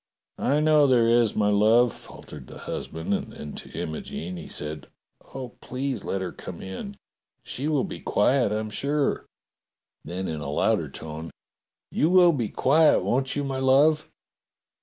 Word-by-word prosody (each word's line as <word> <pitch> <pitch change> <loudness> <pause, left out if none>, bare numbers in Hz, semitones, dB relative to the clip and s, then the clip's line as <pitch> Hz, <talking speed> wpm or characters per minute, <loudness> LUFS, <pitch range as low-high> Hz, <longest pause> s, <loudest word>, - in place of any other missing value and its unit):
"I 145 +3 +2
know 155 -2 +5
there 120 -3 +4
is, 115 -2 +3
my 105 -1 +2
love," 110 +3 +4
faltered 70 -4 -12
the - - -11
husband, 80 0 -4
and - - -2
then 75 - -8
to - - -7
Imogene 80 +3 -5
he 85 - -8
said: 75 -1 -5 0.5
"Oh, 130 -2 -5
please 130 +1 -3
let 95 - -2
her 95 - -3
come 85 - -9
in. 200 - -7 0.5
She 140 +4 -4
will 150 -4 +1
be - - -6
quiet, 125 +1 +2
I'm 110 0 -2
sure." 140 +5 0 0.8
Then 95 +2 -4
in 80 -2 -4
a 70 - -4
louder 75 - +1
tone: 80 +1 -7 0.6
"You 155 - +2
will 180 -1 +6
be 120 -9 -2
quiet, 155 +4 +4
won't 130 +2 0
you, 145 - -1
my 135 -1 -3
love. 145 +4 +4
120 Hz, 160 wpm, -25 LUFS, 95-140 Hz, 0.8 s, will